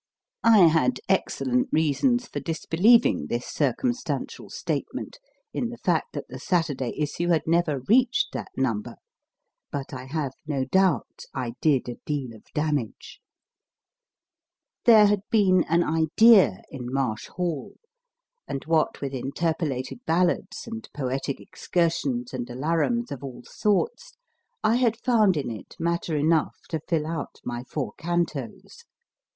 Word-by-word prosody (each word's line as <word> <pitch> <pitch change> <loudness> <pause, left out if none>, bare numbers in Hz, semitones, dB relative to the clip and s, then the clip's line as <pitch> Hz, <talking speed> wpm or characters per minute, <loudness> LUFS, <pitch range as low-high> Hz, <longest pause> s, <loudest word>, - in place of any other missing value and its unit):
I 220 -5 +7
had 165 +11 +3
excellent 255 +1 +1
reasons 240 - +2
for - - -4
disbelieving 180 +8 +3
circumstantial 240 - -2
statement - - -4 0.3
in 240 - -1
the 240 - -8
fact 175 -7 0
that 145 - -5
the 130 - -8
Saturday 145 -6 -1
issue 150 +3 -1
had 165 -3 +2
never 160 -4 +1
reached 240 - +3
that - - -4
number, - - -1 0.8
but 140 -1 -5
I 130 -1 -6
have 140 0 -2 0.2
no 140 -3 -1
doubt. 180 - +1
I 120 -2 -3
did 140 -6 +2
a 120 - -5
deal 135 -6 -3
of 110 - -17
damage. 150 -7 -2 1.7
There 220 -3 +8
had 205 -1 +2
been 190 -5 +4
an 170 +1 +2
idea 165 - +5
in 130 -3 -6
1 125 - -6
Marsh 120 -5 -1
Hall/ 170 -7 -4 0.7
and 135 - -4
what 160 0 +1
with 140 -1 -3
interpolated 145 - -2
ballads 175 +2 0
and 225 -1 -7
poetic 135 0 -2
excursions 145 -8 -1
and 120 -2 -4
alarums 165 - 0
of 140 0 -6
all 130 -3 -8
sorts, 465 - -1 0.5
I 220 +2 +4
had 235 -3 +2
found 220 -8 +3
in 135 -5 -2
it 110 -4 -9
matter 170 -1 -1
enough 155 +1 +2
to 160 -3 -2
fill 160 -3 0
out 160 -2 -4
my 120 0 -4
four 140 0 -4
cantos. 165 -8 -3
160 Hz, 135 wpm, -25 LUFS, 135-195 Hz, 1.7 s, There